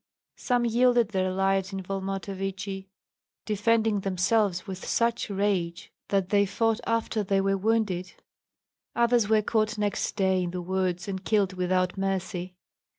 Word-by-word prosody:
Some 245 -1 +1
yielded 240 -1 +3
their 185 -3 0
lives 195 0 +1
in 195 -1 -4
Volmontovichi, 195 0 -4 0.6
defending 220 0 +2
themselves 195 0 +1
with 190 -2 -7
such 235 -1 0
rage 190 -4 -1
that 195 -2 0
they 200 0 +3
fought 225 +3 +1
after 230 -1 0
they 195 0 +1
were 195 0 +2
wounded; 195 -3 0 0.8
others 235 -2 +3
were 215 -1 +4
caught 215 0 0
next 205 -1 -1
day 190 -2 +2
in 175 - -2
the 180 +1 -4
woods 185 0 -1
and 190 -1 -4
killed 200 -3 +1
without 185 +1 0
mercy. 190 -1 -2
195 Hz, 140 wpm, -27 LUFS, 185-215 Hz, 0.8 s, were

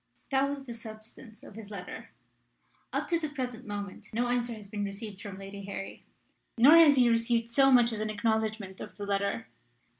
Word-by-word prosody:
That 270 +1 +3
was 280 -1 -4
the 245 -3 -7
substance 220 0 -11
of - - -12
his 215 -1 -10
letter. 200 -4 -8 0.8
Up - - -2
to 335 -2 +2
the 310 -2 -3
present 255 -6 -5
moment 205 -2 -6
no 240 +2 0
answer 240 -1 0
has 210 -2 -11
been 205 0 -4
received 200 0 -6
from 200 -2 -7
Lady 195 0 -8
Harry. 195 0 -7 0.5
Nor 280 +8 +8
has 315 -4 +8
he 250 -2 +5
received 230 0 +2
so 270 +2 +5
much 240 -2 +6
as 220 - -2
an 215 - -1
acknowledgment 220 -2 -1
of - - -8
the 205 - -6
letter. 200 +3 -1
225 Hz, 190 wpm, -30 LUFS, 205-245 Hz, 0.8 s, Nor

